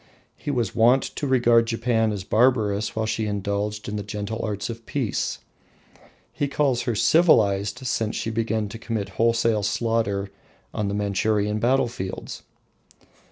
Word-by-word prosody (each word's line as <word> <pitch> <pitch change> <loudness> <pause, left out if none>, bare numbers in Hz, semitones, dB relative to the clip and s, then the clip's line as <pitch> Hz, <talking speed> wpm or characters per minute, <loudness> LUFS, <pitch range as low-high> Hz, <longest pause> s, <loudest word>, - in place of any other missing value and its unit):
He - - -7
was 120 -8 -1
wont 120 +4 +4
to 145 - -4
regard 120 -3 +4
Japan 115 -1 +1
as 100 -3 -4
barbarous 110 -2 +2
while 110 0 0
she 110 0 -1
indulged 105 +1 -2
in 105 - -3
the - - -3
gentle 105 +2 -4
arts 105 -2 -3
of 115 0 -7
peace: 125 -9 -2 1.0
he 145 - -1
calls 135 -4 +1
her 120 - -1
civilised 105 - +3
since 110 -3 -1
she 115 - -2
began 110 -1 -1
to 115 - -8
commit 110 -4 -3
wholesale 115 -2 +2
slaughter 105 -2 -1 0.4
on 105 - -1
Manchurian 105 +1 0
battlefields. 120 -5 -1
110 Hz, 140 wpm, -24 LUFS, 105-120 Hz, 1.0 s, wont